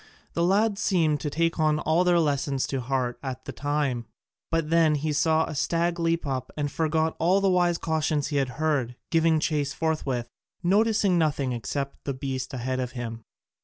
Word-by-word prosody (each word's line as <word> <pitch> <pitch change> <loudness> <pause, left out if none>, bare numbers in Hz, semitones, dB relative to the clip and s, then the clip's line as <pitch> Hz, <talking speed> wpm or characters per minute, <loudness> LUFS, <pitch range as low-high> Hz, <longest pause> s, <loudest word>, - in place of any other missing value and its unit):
The 170 - -1
lad 200 +3 +2
seemed 165 -8 +2
to 145 - -3
take 165 +3 0
all 155 +2 +2
their 175 -1 +4
lessons 140 -3 0
to 135 -2 -3
heart 125 -1 -1
at 130 -1 -6
the - - -5
time: 140 -5 -1 0.4
but 165 -1 -1
then 165 -2 +4
he 150 +1 -1
saw 160 +2 +3
a - - -6
stag 170 +4 0
leap 165 0 0
up, 130 -2 -3
and 145 -1 -1
forgot 160 +1 0
all 180 +4 +3
the 195 -1 +2
wise 175 -1 +3
cautions 155 -3 0
he 145 - -1
had 135 -2 +1
heard, 145 -6 0 0.2
giving 165 -1 +3
chase 150 -3 0
forthwith, 140 -7 -1 0.4
noticing 200 -1 +3
nothing 145 -4 +1
except 140 +4 -4
the 140 - -2
beast 130 -1 -4
ahead 130 0 -2
of 125 -1 -3
him. 115 -2 -5
155 Hz, 180 wpm, -26 LUFS, 135-165 Hz, 0.4 s, their